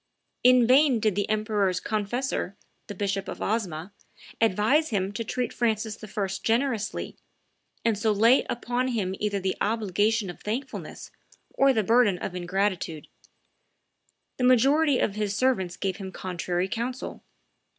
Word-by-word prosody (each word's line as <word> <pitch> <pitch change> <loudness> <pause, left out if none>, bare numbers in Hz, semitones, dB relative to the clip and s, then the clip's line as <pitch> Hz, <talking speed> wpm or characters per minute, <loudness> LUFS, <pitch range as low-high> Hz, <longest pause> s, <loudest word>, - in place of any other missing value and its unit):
In 250 -1 +6
vain 260 0 +5
did 215 -1 +1
the 205 +2 -1
emperor's 210 -4 +1
confessor, 215 -1 -2 0.3
the 205 - -7
Bishop 195 0 -2
of - - -6
Osma, 195 -4 -2 0.5
advise 225 +9 +3
him 195 -3 -1
to 210 +3 -4
treat 245 +2 -3
Francis 220 -2 -1
I. 205 -1 -2
generously, 230 -2 -1 0.7
and 230 -2 +3
so 215 +2 +1
lay 225 +5 +5
upon 245 +1 -1
him 210 -7 -1
either 205 -1 -1
the 190 0 -1
obligation 210 -1 +1
of - - -15
thankfulness 255 +5 -5 0.4
or 275 0 +4
the 220 -5 +1
burden 225 -3 +4
of 180 - -5
ingratitude; 180 -3 -2 1.3
the 255 - -2
majority 270 +4 +4
of 200 - 0
his 205 -1 -2
servants 195 -9 0
gave 190 -2 -2
him 190 -2 -7
contrary 180 -1 -2
counsel. 235 +4 -4
215 Hz, 140 wpm, -26 LUFS, 195-240 Hz, 1.3 s, In